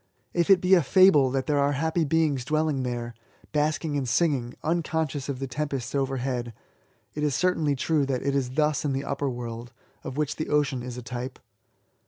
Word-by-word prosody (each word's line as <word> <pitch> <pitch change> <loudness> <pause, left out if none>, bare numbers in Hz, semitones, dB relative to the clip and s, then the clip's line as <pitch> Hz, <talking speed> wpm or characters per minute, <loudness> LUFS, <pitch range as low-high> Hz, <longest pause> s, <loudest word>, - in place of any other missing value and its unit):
If 170 +1 +1
it 190 -2 +6
be 185 +1 +3
a 180 - +7
fable 155 -3 +5
that 135 0 -1
there 145 -2 +1
are 140 +1 +2
happy 160 +3 0
beings 150 -4 +1
dwelling 155 0 0
there, 120 -2 -3 0.4
basking 150 0 0
and 135 -3 -1
singing, 130 -3 +1
unconscious 155 -4 -1
of 140 - -2
the 135 - -3
tempests 135 -2 -3
oyerhead, 130 -3 -2 0.6
it 150 - -4
is 150 -3 +1
certainly 160 -6 +1
true 145 +1 +1
that 130 -2 -1
it 140 0 0
is 135 -3 0
thus 150 +2 +1
in 145 -2 0
the 135 +1 -2
upper 140 0 -1
world, 120 -1 -6 0.3
of 130 - -6
which 150 -1 -1
the 155 - -3
ocean 145 -4 +1
is 125 0 -6
a 125 - -7
type. 125 +2 -5
140 Hz, 195 wpm, -26 LUFS, 130-155 Hz, 0.6 s, a